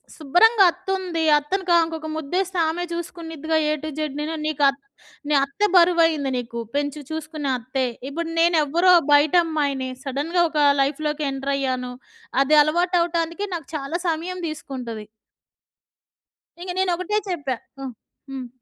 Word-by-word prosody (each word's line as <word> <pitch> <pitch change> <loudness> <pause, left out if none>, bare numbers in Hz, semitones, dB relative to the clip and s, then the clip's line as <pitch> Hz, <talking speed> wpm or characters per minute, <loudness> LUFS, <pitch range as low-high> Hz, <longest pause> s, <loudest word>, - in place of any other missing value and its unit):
శుభ్రంగా 385 - +4
అత్తుంది. 370 -2 -3 0.2
అత్తను 370 +7 -3
క - - +4
ఇంకొక 320 -1 -6
ము‌ద్దేస్తే 360 +5 -2
ఆమే 350 +2 -2
చూసుకునిద్దిగా 325 -2 -4
ఏ - - +2
టూ 310 - -4
జడ్. 305 -3 -2
నేను 315 +2 -3
నీకు 300 -2 -2
అత్ 275 +1 -2 0.5
నీ 300 - +2
అత్తే 405 +10 0
బరువుయింది 330 -5 +4
నీకు. 235 -1 -6 0.2
పెంచి 290 +1 -2
చూసుకునే 310 -2 -4
అత్తే. 260 +2 -2 0.2
ఇప్పుడు 330 +4 -4
నేనెవ్వరో 335 +1 +4 0.2
బయటమ్మాయిని. 290 -3 +2
సడెన్‌గా 295 +6 0
ఒక 300 -1 +2 0.2
లైఫ్‌లోకి 300 +2 -1
ఎంటర్ 270 +1 -3
అయ్యాను. 255 -2 -2 0.5
అది 305 +3 +3
అలవాటవటానికి 340 +2 0
నాకు 325 -5 -6
చాలా 300 +4 -3
సమయం 340 +3 -2
తీసుకుంటది. 245 -8 -6 1.5
ఇంక 360 +1 -7
నేనొకటే 365 +2 0
చెప్పా! 285 -8 -2 0.2
హ్మ్. 265 -2 -6 0.4
హ్మ్. 260 -2 -6
315 Hz, 130 wpm, -23 LUFS, 280-345 Hz, 1.5 s, శుభ్రంగా